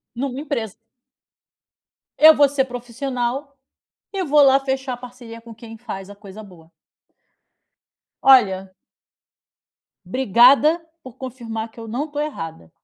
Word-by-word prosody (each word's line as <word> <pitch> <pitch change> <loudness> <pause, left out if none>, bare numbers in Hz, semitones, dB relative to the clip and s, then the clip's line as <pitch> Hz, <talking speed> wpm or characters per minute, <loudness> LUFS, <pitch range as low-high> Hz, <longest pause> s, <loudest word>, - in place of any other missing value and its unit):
Numa 260 +1 -4
empresa. 230 -8 -4 1.5
Eu 315 +1 +8
vou 285 -1 +5
ser 275 -1 0
profissional 250 +2 -5 0.6
e 385 -2 -2
vou 295 -1 +4
lá 270 -1 +6
fechar 265 -1 -3
a - - -9
parceria 245 -2 -12
com 230 0 -13
quem 225 0 -12
faz 205 -4 -8
a 205 - -12
coisa 205 +1 -12
boa. 170 -5 -17 1.5
Olha 195 -8 +4 1.3
obrigada 265 - +4 0.2
por 255 -3 -13
confirmar 230 -4 -6
que - - -15
eu 225 - -9
não 265 +8 -3
tô 290 0 -6
errada. 165 - -6
245 Hz, 125 wpm, -21 LUFS, 220-275 Hz, 1.5 s, Eu